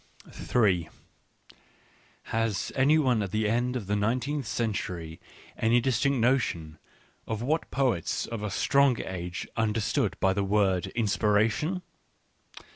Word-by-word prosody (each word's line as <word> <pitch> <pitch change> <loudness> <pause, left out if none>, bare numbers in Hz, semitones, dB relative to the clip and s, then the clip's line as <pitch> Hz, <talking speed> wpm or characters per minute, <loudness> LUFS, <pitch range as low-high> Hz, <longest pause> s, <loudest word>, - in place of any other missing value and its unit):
Ha)s 115 -3 -1
any 140 +4 +4
one 125 -7 +2
at 100 - -2
the 110 +3 0
end 120 +3 0
of 120 -5 -3
the 100 +2 -1
nineteenth 125 +6 -1
century 90 -8 -3 0.4
any 115 +2 +3
distinct 135 +3 +1
notion 110 -11 0 0.5
of 110 +1 -3
what 155 +6 -1
poets 125 -11 0
of 115 -2 -5
a 105 - -2
stronger 140 +5 +2
age 90 0 -5
understood 110 -1 0
by 95 0 +3
the 100 +1 0
word 95 -2 +1
inspiration 110 - +1
110 Hz, 120 wpm, -28 LUFS, 100-130 Hz, 0.5 s, any